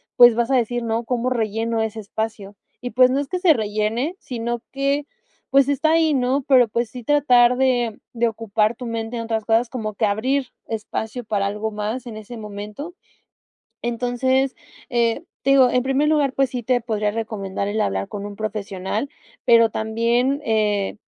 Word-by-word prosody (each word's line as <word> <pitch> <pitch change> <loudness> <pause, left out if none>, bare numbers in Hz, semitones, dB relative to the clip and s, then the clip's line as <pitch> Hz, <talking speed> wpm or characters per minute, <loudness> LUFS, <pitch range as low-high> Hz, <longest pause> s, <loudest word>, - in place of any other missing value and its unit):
pues, 240 -1 +8
vas 235 +1 0
a 265 - +3
decir, 240 0 0
¿no?, 230 +1 -1
"¿Cómo 250 +1 -1
relleno 225 -1 -1
ese 220 0 -3
espacio?", 210 -1 -5 0.3
y 245 - -5
pues, 255 +2 +5
no 270 - +1
es 285 - -3
que 365 - -2
se 355 -4 +5
rellene, 220 - -1
sino 235 -1 -4
que, 275 +1 0 0.4
pues, 275 0 +4
está 300 +3 +2
ahí, 320 -1 +3
¿no?, 265 +1 +1
pero, 255 -4 +6
pues, 235 +1 -1
sí 245 +1 -9
tratar 250 -3 +4
de 245 -4 +1
de 235 0 +1
ocupar 215 0 0
tu 245 - -8
mente 230 +1 -4
en 230 - -3
otras 225 -1 -2
cosas, 230 +2 +2
como 220 -4 -4
que 220 - +1
abrir 255 +6 0 0.2
espacio 220 +2 -4
para 205 -2 0
algo 210 +2 -3
más 215 +4 -4
en 230 - -7
ese 215 +3 -9
momento. 210 - -7 0.9
Entonces, 250 +3 0 0.3
eh, 235 +5 +1 0.2
te 275 - +1
digo 265 -2 +6
en 250 0 +1
primer 270 +3 +1
lugar, 295 -3 +2
pues 270 -1 +1
sí, 245 -2 -4
te 245 +1 +1
podría 215 -3 -1
recomendar 205 -3 -3
el 215 +2 -2
hablar 95 0 -1
con 205 0 -6
un 205 0 -6
profesional, 210 +3 -3 0.3
pero 230 -1 +6
también, 235 +6 0
eh, 210 -4 0
235 Hz, 180 wpm, -22 LUFS, 215-255 Hz, 0.9 s, pues